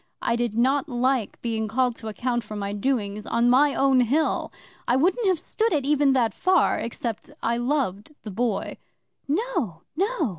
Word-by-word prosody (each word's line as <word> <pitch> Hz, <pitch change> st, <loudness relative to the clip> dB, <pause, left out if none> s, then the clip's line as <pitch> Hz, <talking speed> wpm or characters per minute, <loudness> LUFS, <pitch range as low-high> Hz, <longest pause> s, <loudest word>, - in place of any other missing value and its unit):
I 235 Hz, -, +1 dB
did 235 Hz, -2 st, -1 dB
not 270 Hz, +5 st, +2 dB
like 250 Hz, -2 st, 0 dB
being 220 Hz, -2 st, -1 dB
called 250 Hz, +3 st, +1 dB
to 220 Hz, -, -8 dB
account 240 Hz, +2 st, -2 dB
for 215 Hz, 0 st, -8 dB
my 200 Hz, -1 st, -3 dB
doings 210 Hz, -2 st, -2 dB
on 235 Hz, +1 st, +2 dB
my 280 Hz, +3 st, +4 dB
own 270 Hz, -1 st, +4 dB
Hill. 285 Hz, +7 st, +1 dB, 0.4 s
I 245 Hz, -, +3 dB
wouldn't 370 Hz, -, +2 dB
have 370 Hz, -2 st, +3 dB
stood 450 Hz, +7 st, -1 dB
it 290 Hz, -5 st, 0 dB
even 290 Hz, -1 st, +3 dB
that 240 Hz, -4 st, +2 dB
far 370 Hz, 0 st, +2 dB
except 230 Hz, -1 st, -4 dB
I 235 Hz, +1 st, +1 dB
loved 245 Hz, -2 st, -2 dB
the 215 Hz, -, -6 dB
Boy. 225 Hz, +1 st, -2 dB, 0.5 s
'"No! 305 Hz, -, -1 dB
No!" 380 Hz, -, 0 dB
250 Hz, 175 wpm, -25 LUFS, 225-290 Hz, 0.5 s, my